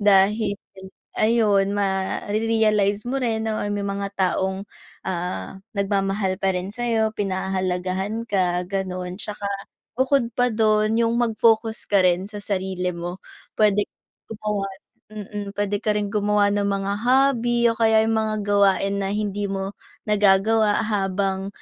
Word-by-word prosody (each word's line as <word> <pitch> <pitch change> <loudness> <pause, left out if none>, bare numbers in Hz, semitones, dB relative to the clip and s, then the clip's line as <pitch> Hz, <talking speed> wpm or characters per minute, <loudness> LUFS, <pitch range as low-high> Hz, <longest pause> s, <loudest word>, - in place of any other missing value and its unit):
dahil 205 +1 +3 0.6
ayun 210 -3 +3
mare-realize 205 +1 +1
mo 270 - -1
rin 225 -3 -1
na 215 - -1 0.2
may 205 -1 -2
mga 200 0 -2
taong, 190 +1 0 0.4
ah, 175 - -4 0.2
nagmamahal 195 -1 0
pa 190 -1 +1
rin 180 +1 -3
sa'yo, 225 -1 0
pinahahalagahan 190 +2 -2
ka 180 -2 +1
ganon. 185 -2 -3
Tsaka 210 -1 -6 0.5
bukod 260 -2 +2
pa 245 0 +3
dun 215 0 +2
yung 230 0 +2
mag-focus 225 -1 +1
ka 200 -2 +4
rin 180 +2 +2
sa 210 - -9
sarili 185 -2 -2
mo. 175 +1 -5 0.4
Pwede 210 -1 +3 0.4
gumawa, 210 -2 -3 0.4
mm, 205 -1 -7
pwede 205 0 0
ka 210 -1 0
rin 205 0 -2
gumawa 205 -1 +2
ng 200 0 +1
mga 195 0 -1
hobby 245 -2 +3
o - - -9
kaya 220 -1 +4
yung 225 - +1
mga 215 0 -1
gawain 200 -1 +2
na 195 - -1
hindi 205 0 -2
mo 195 0 -3 0.3
nagagawa 210 +1 +3
habang 195 -2 -1
205 Hz, 135 wpm, -23 LUFS, 195-220 Hz, 0.6 s, ka